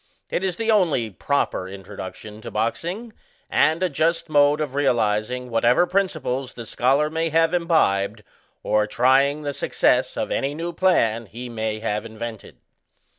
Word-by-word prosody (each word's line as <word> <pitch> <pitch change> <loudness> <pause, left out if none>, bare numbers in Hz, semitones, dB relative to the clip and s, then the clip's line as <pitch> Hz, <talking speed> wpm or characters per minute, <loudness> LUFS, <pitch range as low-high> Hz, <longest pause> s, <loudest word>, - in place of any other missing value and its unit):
It 185 - -1
is 185 -3 0
the 225 0 +1
only 160 - +2
proper 100 -4 -1
introduction 100 +2 -9
to - - -7
boxing, 175 - -3 0.4
and 160 +5 +3
a - - +3
just 165 +2 0
mode 145 0 +4
of 150 -4 -3
realizing 125 -2 0
whatever 120 +8 +3
prinpiples 155 -9 -1
the 115 - -7
scholar 135 +6 +2
may 165 +1 -1
have 165 +1 +2
imbibed, 110 - +1 0.4
or 105 -1 +2
trying 135 +6 +3
the 145 -1 -3
success - - +1
of - - -2
any 140 +2 -1
new 170 +2 -4
plan 115 - +2
he 120 +4 -8
may 110 -2 -3
have 105 -1 -2
invented. 115 -1 -8
135 Hz, 150 wpm, -23 LUFS, 110-165 Hz, 0.4 s, mode